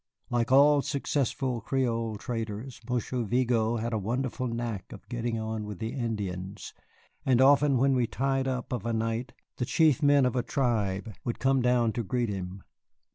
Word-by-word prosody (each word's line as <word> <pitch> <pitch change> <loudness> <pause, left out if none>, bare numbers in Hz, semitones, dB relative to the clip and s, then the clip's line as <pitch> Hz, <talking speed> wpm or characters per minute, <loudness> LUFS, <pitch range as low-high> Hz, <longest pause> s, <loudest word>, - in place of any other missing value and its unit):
Like 120 0 +1
all 145 +2 +6
successful 135 -3 -1
Creole 115 -3 -1
traders, 115 +2 -5
Monsieur 125 0 -1
Vigo 115 0 +1
had 115 +1 -2
a 110 - +1
wonderful 125 +4 -2
knack 115 -4 -4
of - - -11
getting 120 -1 -2
on 110 0 -3
with 105 -2 -6
the 115 +5 -4
Indians, 100 -7 -4 0.5
and 130 -2 +3
often 140 +1 +5
when 135 +2 +3
we 125 -2 +2
tied 135 +1 0
up 125 -1 -3
of 120 -6 -2
a 115 - 0
night 115 +3 -2 0.2
the 125 - -1
chief 155 +1 +3
men 145 -2 +5
of 125 - 0
a 125 - +2
tribe 110 -6 -1
would 120 - -2
come 135 -1 +2
down 120 -2 +2
to 120 - -2
greet 120 +2 -1
him. 95 -1 -5
120 Hz, 175 wpm, -28 LUFS, 110-130 Hz, 0.5 s, all